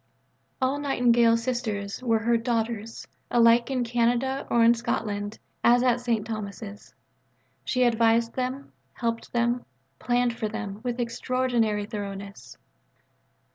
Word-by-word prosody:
All 265 Hz, +2 st, 0 dB
Nightingale 240 Hz, -4 st, +3 dB
Sisters 230 Hz, -4 st, -3 dB
were 230 Hz, -3 st, +2 dB
her 235 Hz, +2 st, +1 dB
"daughters," 230 Hz, -1 st, -2 dB, 0.2 s
alike 235 Hz, 0 st, +4 dB
in 260 Hz, -2 st, 0 dB
Canada 245 Hz, +3 st, 0 dB
or 235 Hz, -1 st, +4 dB
in 230 Hz, +1 st, +7 dB
Scotland, 210 Hz, -2 st, -3 dB, 0.3 s
as 240 Hz, +1 st, +5 dB
at 245 Hz, -1 st, +2 dB
St. 230 Hz, -4 st, 0 dB
Thomas's. 210 Hz, -1 st, -7 dB, 0.7 s
She 255 Hz, 0 st, +1 dB
advised 230 Hz, -1 st, +3 dB
them, 260 Hz, +2 st, -4 dB, 0.2 s
helped 230 Hz, -1 st, -3 dB
them, 240 Hz, +1 st, 0 dB, 0.4 s
planned 245 Hz, 0 st, +1 dB
for 215 Hz, -2 st, -3 dB
them, 210 Hz, -2 st, -5 dB
with 245 Hz, -1 st, -2 dB
an 245 Hz, -, -3 dB
extraordinary 235 Hz, -3 st, 0 dB
thoroughness. 200 Hz, -2 st, -7 dB
235 Hz, 125 wpm, -26 LUFS, 220-245 Hz, 0.7 s, in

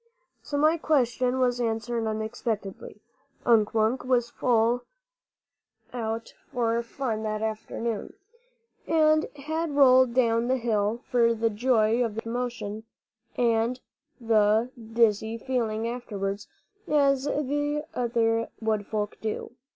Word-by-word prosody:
So 285 Hz, -, -4 dB
my 310 Hz, +3 st, +4 dB
question 255 Hz, -4 st, +1 dB
was 245 Hz, -1 st, +1 dB
answered 230 Hz, 0 st, -1 dB
unexpectedly. 220 Hz, -2 st, -4 dB, 0.4 s
Unk 225 Hz, -2 st, +3 dB
Wunk 225 Hz, +4 st, +2 dB
was 245 Hz, -2 st, +1 dB, 1.6 s
out 225 Hz, -1 st, -4 dB, 0.2 s
for 235 Hz, -1 st, +1 dB
fun 235 Hz, -2 st, -3 dB
that 215 Hz, 0 st, -2 dB
afternoon, 220 Hz, 0 st, -3 dB, 0.7 s
and 310 Hz, -1 st, +4 dB
had 310 Hz, +2 st, -3 dB
rolled 260 Hz, -3 st, +6 dB
down 230 Hz, -2 st, +2 dB
the 260 Hz, +1 st, +2 dB
hill 225 Hz, -1 st, 0 dB
for 235 Hz, -2 st, +2 dB
the 225 Hz, 0 st, 0 dB
joy 225 Hz, +1 st, +2 dB
of 225 Hz, -3 st, -3 dB
the 225 Hz, -, -4 dB
swift 230 Hz, -, -5 dB
motion 235 Hz, -4 st, -4 dB, 0.5 s
and 235 Hz, +1 st, +1 dB, 0.4 s
the 220 Hz, +1 st, +3 dB, 0.2 s
dizzy 225 Hz, -1 st, +2 dB
feeling 230 Hz, -3 st, -1 dB
afterwards, 205 Hz, -4 st, -4 dB, 0.4 s
as 280 Hz, -2 st, +2 dB, 0.7 s
other 230 Hz, -2 st, +1 dB
wood 215 Hz, -2 st, -1 dB
folk 210 Hz, -1 st, -3 dB
do. 220 Hz, +2 st, -4 dB
230 Hz, 110 wpm, -27 LUFS, 220-250 Hz, 1.6 s, rolled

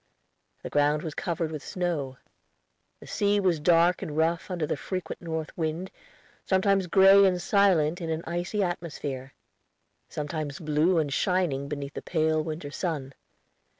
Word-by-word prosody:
The -, -, -5 dB
ground 145 Hz, +1 st, +2 dB
was 160 Hz, -3 st, -4 dB
covered 165 Hz, -1 st, -2 dB
with 155 Hz, -2 st, -6 dB
snow. 155 Hz, -8 st, -3 dB, 0.8 s
The -, -, -11 dB
sea 205 Hz, 0 st, +1 dB
was 180 Hz, -5 st, +2 dB
dark 170 Hz, +2 st, +4 dB
and 150 Hz, -1 st, -5 dB
rough 165 Hz, +3 st, +1 dB
under 175 Hz, -4 st, -1 dB
the -, -, -1 dB
frequent 185 Hz, -2 st, -5 dB
north 160 Hz, -2 st, -4 dB
wind, 165 Hz, +3 st, -3 dB, 0.5 s
sometimes 190 Hz, 0 st, +2 dB
gray 195 Hz, +2 st, +7 dB
and 185 Hz, -2 st, +3 dB
silent 175 Hz, -4 st, +2 dB
in 165 Hz, -, -3 dB
an 160 Hz, +1 st, -2 dB
icy 175 Hz, +5 st, -1 dB
atmosphere; 150 Hz, -7 st, -4 dB, 0.7 s
sometimes 150 Hz, -1 st, -4 dB
blue 155 Hz, +3 st, +2 dB
and 150 Hz, -4 st, 0 dB
shining 175 Hz, -8 st, 0 dB
beneath 140 Hz, -1 st, -5 dB
the -, -, -6 dB
pale 155 Hz, -2 st, +1 dB
winter 155 Hz, -2 st, -5 dB
sun. 145 Hz, -6 st, -3 dB
165 Hz, 150 wpm, -27 LUFS, 150-180 Hz, 0.8 s, gray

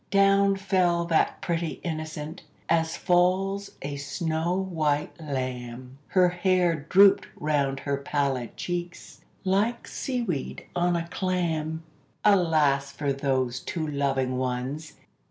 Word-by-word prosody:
Down 195 Hz, 0 st, +4 dB
fell 185 Hz, -3 st, +1 dB
that 165 Hz, -2 st, +1 dB
pretty 170 Hz, -2 st, -2 dB
innocent, 155 Hz, 0 st, -5 dB, 0.3 s
as 165 Hz, 0 st, +1 dB
falls 190 Hz, +2 st, +1 dB
a 140 Hz, 0 st, -4 dB
snow 160 Hz, +4 st, -1 dB
white 155 Hz, -6 st, 0 dB
lamb; 130 Hz, -2 st, -5 dB
Her 180 Hz, -2 st, +4 dB
hair 175 Hz, -4 st, +1 dB
drooped 200 Hz, +1 st, +6 dB
round 140 Hz, -3 st, 0 dB
her 140 Hz, -1 st, -1 dB
pallid 140 Hz, -3 st, -2 dB
cheeks, 175 Hz, 0 st, -5 dB, 0.2 s
like 205 Hz, +5 st, +1 dB
sea 250 Hz, -2 st, -2 dB
weed 165 Hz, -, -4 dB
on 175 Hz, 0 st, +2 dB
a 170 Hz, 0 st, -2 dB
clam. 165 Hz, -4 st, -1 dB, 0.4 s
Alas 155 Hz, -8 st, +3 dB
for 140 Hz, -2 st, -1 dB
those 130 Hz, -2 st, 0 dB
two 160 Hz, +3 st, -3 dB
loving 135 Hz, -3 st, 0 dB
ones! 130 Hz, +5 st, -3 dB
160 Hz, 120 wpm, -26 LUFS, 140-180 Hz, 0.4 s, drooped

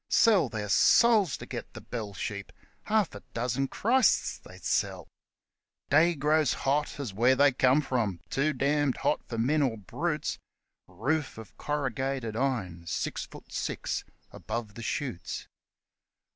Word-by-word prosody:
Sell 215 Hz, -5 st, +5 dB
their 105 Hz, -3 st, -4 dB
souls 205 Hz, -, +5 dB
to -, -, -8 dB
get -, -, -6 dB
the -, -, -6 dB
bell 110 Hz, -4 st, -5 dB
sheep 100 Hz, +2 st, -5 dB, 0.3 s
half 215 Hz, -4 st, +1 dB
a 100 Hz, -, -7 dB, 0.2 s
dozen 125 Hz, +3 st, 0 dB
Christs 240 Hz, -, +2 dB
they'd -, -, -14 dB
sell! -, -, -1 dB, 0.8 s
Day 165 Hz, +4 st, +5 dB
grows 150 Hz, 0 st, +2 dB
hot 145 Hz, +2 st, 0 dB
as 125 Hz, -8 st, -4 dB
where 120 Hz, +6 st, +4 dB
they 140 Hz, +1 st, +5 dB
come 130 Hz, +2 st, +4 dB
from 115 Hz, -, -1 dB
too 140 Hz, +3 st, +2 dB
damned 140 Hz, 0 st, +1 dB
hot 150 Hz, -, 0 dB
for 115 Hz, -, -5 dB
men 140 Hz, +7 st, +2 dB
or 125 Hz, -5 st, +1 dB
brutes; 100 Hz, -3 st, -3 dB, 0.5 s
Roof 145 Hz, +4 st, -2 dB
of 110 Hz, -2 st, -11 dB
corrugated 135 Hz, -5 st, -2 dB
iron, 100 Hz, -10 st, -2 dB
six -, -, -2 dB
foot -, -, -14 dB
six -, -, -2 dB, 0.3 s
above 115 Hz, -3 st, -5 dB
the 115 Hz, -, -9 dB
shoots 120 Hz, -, -4 dB
135 Hz, 145 wpm, -29 LUFS, 115-150 Hz, 0.8 s, Sell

